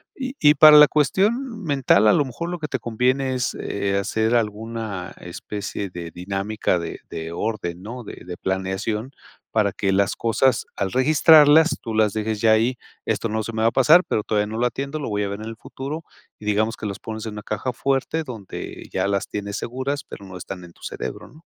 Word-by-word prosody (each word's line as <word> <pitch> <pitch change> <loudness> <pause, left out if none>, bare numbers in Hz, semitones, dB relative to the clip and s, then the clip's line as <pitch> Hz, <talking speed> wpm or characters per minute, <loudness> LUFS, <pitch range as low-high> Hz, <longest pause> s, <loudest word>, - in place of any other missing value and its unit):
Y 265 -1 -4
y 150 0 +6
para 155 -1 +9
la 150 0 +10
cuestión 215 - +1
mental, 135 - +3
a 105 - +6
lo 145 - +3
mejor 135 +7 -5
lo 175 - -3
que 150 - -3
te 130 - -2
conviene 130 +4 0
es, 125 -2 -1
eh, 100 -1 -1
hacer 110 +3 0
alguna 110 -4 -3
especie 100 +2 -6
de 85 -1 -6
dinámica 95 +1 -1
de 85 -1 -6
de 80 0 -5
orden, 95 -3 -3
¿no? 120 +3 -7
De - - -10
de 90 -1 -7
planeación, 95 +5 -2 0.4
para 105 -3 +2
que 95 0 -1
las 95 0 +2
cosas, 120 +3 +1
al 95 -1 -2
registrarlas, 155 +3 +6
tú 115 - -5
las 110 -2 +2
dejes 110 -1 -2
ya 110 -1 +5
ahí, 120 +3 +2 0.3
esto 115 - -1
no 110 +1 -1
se 115 - -6
me 110 - -2
va 110 - +4
a 115 - +3
pasar, 155 +7 +6
pero 105 - 0
todavía 105 -1 0
no 110 +1 -5
lo 120 - +1
atiendo, 140 +5 -3
lo 140 - -4
voy 105 0 -1
a 100 - -2
ver 100 +1 -5
en 110 - -6
el 115 0 -7
futuro 145 +7 -6 0.4
y 105 - -11
digamos 110 +2 +1
que - - -8
los 100 - -5
pones 110 0 -6
en 105 - -5
una 105 - -7
caja 110 +6 -3
fuerte 135 +5 -1
donde 115 -9 -8
ya - - 0
las 100 -1 -1
tienes 100 +1 -4
seguras, 130 +4 -3
pero 100 - -11
no 95 -1 -9
están 90 +1 -8
en 85 - -13
tu - - -26
cerebro, - - -6
¿no? 155 - -18
110 Hz, 215 wpm, -23 LUFS, 100-135 Hz, 0.4 s, la